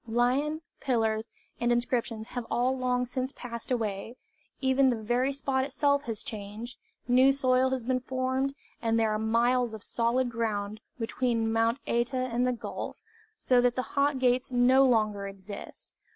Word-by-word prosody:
Lion, 260 Hz, +7 st, +1 dB, 0.2 s
pillars, 225 Hz, -4 st, 0 dB, 0.3 s
and 240 Hz, 0 st, +1 dB
inscriptions 240 Hz, -2 st, -1 dB
have 245 Hz, -2 st, -5 dB
all 250 Hz, +2 st, +1 dB
long 250 Hz, -1 st, 0 dB
since 255 Hz, +1 st, -3 dB
passed 235 Hz, -2 st, -7 dB
away, 220 Hz, -2 st, -2 dB, 0.4 s
even 265 Hz, 0 st, +3 dB
the 245 Hz, -, +1 dB
very 240 Hz, +5 st, 0 dB
spot 270 Hz, -1 st, 0 dB
itself 285 Hz, +1 st, +1 dB
has 225 Hz, -3 st, -4 dB
changed; 215 Hz, +3 st, -7 dB, 0.3 s
new 255 Hz, +2 st, +6 dB
soil 260 Hz, -1 st, +3 dB
has 260 Hz, -2 st, -2 dB
been 255 Hz, +1 st, +1 dB
formed, 260 Hz, +2 st, -1 dB, 0.3 s
and 225 Hz, -1 st, +1 dB
there 220 Hz, -1 st, +2 dB
are 215 Hz, -, 0 dB
miles 235 Hz, +1 st, +2 dB
of 215 Hz, -, -8 dB
solid 240 Hz, +2 st, 0 dB
ground 215 Hz, -2 st, -2 dB, 0.2 s
between 230 Hz, -1 st, 0 dB
Mount 225 Hz, +2 st, +2 dB
Śta 235 Hz, +2 st, 0 dB
and 250 Hz, -1 st, 0 dB
the -, -, +2 dB
gulf, 240 Hz, -, -5 dB, 0.4 s
so 250 Hz, -, +3 dB
that 245 Hz, 0 st, +2 dB
the 255 Hz, -, -4 dB
Hot 280 Hz, 0 st, +3 dB
Gates 255 Hz, 0 st, +1 dB
no 255 Hz, +2 st, +5 dB
longer 215 Hz, -4 st, +1 dB
exist. 195 Hz, +1 st, -10 dB
245 Hz, 160 wpm, -29 LUFS, 225-260 Hz, 0.4 s, new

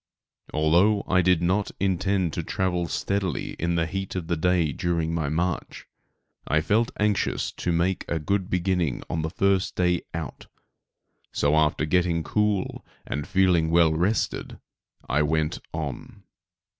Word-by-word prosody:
Although 90 Hz, +7 st, +3 dB
I 90 Hz, 0 st, +4 dB
did 90 Hz, -1 st, +3 dB
not 95 Hz, +4 st, +1 dB
intend 95 Hz, -2 st, 0 dB
to -, -, -2 dB
travel 90 Hz, -2 st, -1 dB
steadily 95 Hz, +1 st, -2 dB
in 85 Hz, +1 st, 0 dB
the 85 Hz, -1 st, +1 dB
heat 95 Hz, +3 st, -4 dB
of 90 Hz, -3 st, -3 dB
the 85 Hz, -, 0 dB
day 85 Hz, -1 st, +2 dB
during 85 Hz, +1 st, -1 dB
my 80 Hz, -4 st, -1 dB
march, 85 Hz, +2 st, -2 dB, 0.6 s
I 80 Hz, -, +3 dB
felt 105 Hz, +8 st, +2 dB
anxious 105 Hz, -1 st, 0 dB
to 90 Hz, -, -3 dB
make 85 Hz, +3 st, 0 dB
a 85 Hz, -, -1 dB
good 95 Hz, +5 st, -1 dB
beginning 90 Hz, -, 0 dB
on 80 Hz, -, -1 dB
the 80 Hz, -, -2 dB
first 95 Hz, +2 st, +1 dB
day 90 Hz, -1 st, +2 dB
out, 85 Hz, -1 st, -6 dB, 0.8 s
so 75 Hz, +1 st, +2 dB
after 75 Hz, 0 st, +2 dB
getting 85 Hz, 0 st, +1 dB
cool 105 Hz, -1 st, 0 dB, 0.2 s
and 75 Hz, +1 st, -4 dB
feeling 90 Hz, -4 st, +3 dB
well 85 Hz, -1 st, +4 dB
rested, 90 Hz, +8 st, -1 dB, 0.5 s
I 75 Hz, +4 st, +2 dB
went 80 Hz, 0 st, 0 dB
on. 75 Hz, -5 st, -6 dB
85 Hz, 145 wpm, -25 LUFS, 80-95 Hz, 0.8 s, I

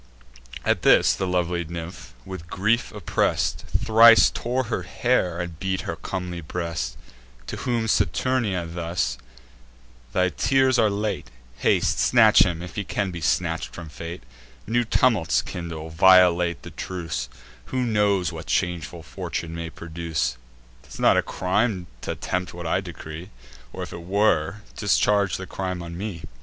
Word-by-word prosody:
At -, -, +2 dB
this -, -, +5 dB
the 95 Hz, -, -2 dB
lovely 90 Hz, -1 st, 0 dB
nymph, 85 Hz, -6 st, -8 dB
with 90 Hz, -3 st, -8 dB
grief 110 Hz, +6 st, +1 dB
oppress'd, -, -, -1 dB, 0.2 s
Thrice 115 Hz, +1 st, +7 dB
tore 125 Hz, +2 st, -1 dB
her 115 Hz, -5 st, -2 dB
hair, 90 Hz, -2 st, 0 dB
and 85 Hz, -2 st, -5 dB
beat 95 Hz, -1 st, -1 dB
her 85 Hz, -, -4 dB
comely 90 Hz, +1 st, -5 dB
breast. 85 Hz, +1 st, -4 dB, 0.5 s
To -, -, -5 dB
whom 120 Hz, -3 st, -1 dB
Saturnia 105 Hz, -1 st, +1 dB
thus: 85 Hz, -7 st, -2 dB, 0.9 s
"Thy 90 Hz, 0 st, +2 dB
tears 130 Hz, +5 st, +2 dB
are 110 Hz, -2 st, +4 dB
late: 105 Hz, -, -2 dB, 0.3 s
Haste, -, -, +2 dB
snatch -, -, +6 dB
him, 85 Hz, -2 st, +3 dB
if 90 Hz, -, -9 dB
he 105 Hz, -, -1 dB
can 100 Hz, 0 st, -2 dB
be 85 Hz, -1 st, -7 dB
snatch'd 80 Hz, +2 st, -1 dB
from 85 Hz, -2 st, -8 dB
fate: 85 Hz, +3 st, -8 dB, 0.4 s
New 120 Hz, +3 st, +1 dB
tumults 110 Hz, -7 st, +2 dB
kindle; 80 Hz, -2 st, -6 dB
violate 90 Hz, -1 st, +5 dB
the -, -, -9 dB
truce: 80 Hz, -9 st, -4 dB, 0.4 s
Who 130 Hz, -1 st, -2 dB
knows 105 Hz, -5 st, +2 dB
what -, -, -8 dB
changeful 85 Hz, -1 st, -1 dB
fortune 80 Hz, +2 st, -5 dB
may 85 Hz, 0 st, -5 dB
produce? 80 Hz, -7 st, -3 dB, 0.5 s
'Tis -, -, -12 dB
not -, -, +5 dB
a -, -, +4 dB
crime 95 Hz, 0 st, -1 dB, 0.2 s
t' -, -, -7 dB
attempt 90 Hz, -1 st, -3 dB
what 85 Hz, -1 st, -7 dB
I 80 Hz, -, +1 dB
decree; 85 Hz, -2 st, -8 dB, 0.4 s
Or, -, -, -5 dB
if -, -, -8 dB
it 85 Hz, -, -7 dB
were, 100 Hz, 0 st, +1 dB
discharge 100 Hz, -1 st, +2 dB
the 95 Hz, -, -6 dB
crime 90 Hz, -2 st, -4 dB
on 85 Hz, 0 st, -7 dB
me." 95 Hz, -3 st, -5 dB
90 Hz, 150 wpm, -24 LUFS, 85-105 Hz, 0.9 s, Thrice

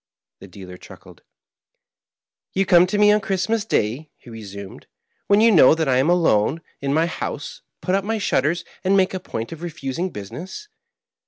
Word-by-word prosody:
The -, -, -12 dB
dealer 90 Hz, -1 st, -11 dB
chuckled. -, -, -15 dB, 0.7 s
" -, -, -52 dB
Ton 195 Hz, +1 st, +2 dB
come 180 Hz, -1 st, +5 dB
to 205 Hz, -, -2 dB
me 210 Hz, 0 st, +5 dB
on 210 Hz, 0 st, +3 dB
Christ 195 Hz, 0 st, -2 dB
mas 225 Hz, -2 st, 0 dB
day," 130 Hz, -, -1 dB
he 120 Hz, -, -15 dB
resumed, 100 Hz, -3 st, -10 dB, 0.4 s
"when 205 Hz, +1 st, +4 dB
you 230 Hz, +1 st, +6 dB
know 155 Hz, -6 st, +6 dB
that 160 Hz, -2 st, -1 dB
I 130 Hz, -1 st, +2 dB
am 135 Hz, +5 st, +2 dB
alone 160 Hz, -4 st, +2 dB, 0.2 s
in 140 Hz, 0 st, -2 dB
my 160 Hz, +3 st, +2 dB
house, 180 Hz, -, -6 dB, 0.2 s
put 185 Hz, -, -2 dB
up 195 Hz, 0 st, +1 dB
my 225 Hz, +2 st, -2 dB
shutters, 170 Hz, -4 st, 0 dB, 0.2 s
and 195 Hz, +1 st, +3 dB
make 190 Hz, -1 st, +2 dB
a 185 Hz, -, -3 dB
point 115 Hz, -9 st, -6 dB
of 165 Hz, -1 st, -9 dB
refusing 170 Hz, +1 st, -4 dB
business. 180 Hz, -, -9 dB
165 Hz, 185 wpm, -21 LUFS, 120-195 Hz, 0.7 s, you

